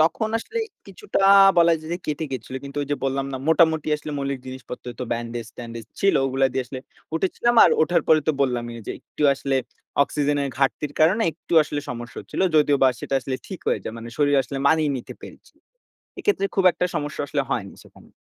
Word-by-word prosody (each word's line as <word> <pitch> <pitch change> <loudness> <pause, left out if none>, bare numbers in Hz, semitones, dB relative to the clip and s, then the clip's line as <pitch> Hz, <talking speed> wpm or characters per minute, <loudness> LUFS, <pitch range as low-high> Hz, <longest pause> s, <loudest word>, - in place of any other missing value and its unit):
তখন 170 +8 +2
আসলে 440 - -5 0.3
কিছুটা 420 - -4 0.4
বলা 170 0 +6
যায় 155 +1 -9
যে 175 - -2
কেটে 155 +1 -2
গিয়েছিলো। 130 0 -5
কিন্তু 140 +1 -9
ওই 140 - -5
যে 145 - +1
বললাম, 135 0 0
না 130 - -2
মোটামুটি 160 -1 +3
আসলে 150 0 -8
মৌলিক 140 -1 -2
জিনিসপত্র। 130 -1 -8
তো - - -1
ব্যান্ডেজ-ট্যান্ডেজ 115 0 -6 0.2
ছিল, 195 0 +3
ওগুলা 135 0 +2
দিয়ে 130 - -1
আসলে 130 +1 -7 0.3
উঠেছিলাম। 195 +8 +1
আর - - +5
ওঠার 175 +3 +2
পরে 155 -1 +6
তো - - +4
বললামই, 120 -3 0
যে - - -3
একটু - - -7
আসলে 135 0 -1 0.5
অক্সিজেনের 145 -1 -1
ঘাটতির 140 +1 0
কারণে 185 +9 +4
একটু 170 - -12
আসলে 145 -1 -4
সমস্যা 120 0 -7
হচ্ছিল। - - -6 0.2
যদিও 145 -1 +4
বা 135 - +7
সেটা - - -3
আসলে 130 +1 -3
ঠিক 190 -4 -7
হয়ে - - +1
যায়। 110 - -6
মানে 115 - -8
শরীর 145 -1 +3
আসলে 140 - -7
মানিয়ে 160 -2 +3
নিতে 125 - -8
পেরেছি। - - -13 0.6
এক্ষেত্রে 405 - +1
খুব 195 - +3
একটা 180 - -1
সমস্যা 145 0 -4
আসলে 140 - 0
হয়নি 100 -7 -3
সেখানে। - - -19
140 Hz, 195 wpm, -23 LUFS, 130-160 Hz, 0.6 s, বা